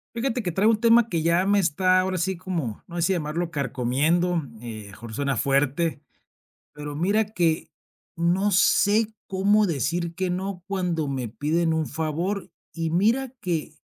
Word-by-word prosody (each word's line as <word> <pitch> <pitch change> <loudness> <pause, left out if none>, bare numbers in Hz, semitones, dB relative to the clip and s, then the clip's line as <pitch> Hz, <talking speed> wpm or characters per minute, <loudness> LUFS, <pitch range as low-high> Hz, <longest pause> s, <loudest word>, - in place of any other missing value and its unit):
Fíjate 245 +1 -1
que 180 -5 -2
traigo 205 +6 +3
un 215 - 0
tema 230 0 +5
que 165 -3 0
ya 170 +3 +2
me 200 0 +3
está 185 +2 +3
ahora 185 0 0
así 185 +1 -1
como, 165 - -4
no 170 - -10
sé - - 0
si 190 +3 +2
llamarlo 165 +1 -2
carcomiendo, 150 +6 +1 0.2
eh, 115 -3 -7
a - - -12
lo 100 - -12
mejor 115 +2 -10
suena 140 0 -1
fuerte, 140 +5 +1 0.7
pero 150 0 -7
mira 200 +8 +2
que, 175 -6 0 0.5
no 180 +5 +1
sé 205 +3 +4 0.2
cómo 200 +2 +3
decir 170 +2 -1
que 185 +1 -1
no, 185 0 -3
cuando 180 -6 -1
me 130 -3 -3
piden 160 +7 0
un 160 -2 -1
favor 165 +6 -2 0.2
y 165 -1 -2
mira 230 +10 +1
que, 165 -5 -3
170 Hz, 175 wpm, -25 LUFS, 150-190 Hz, 0.7 s, tema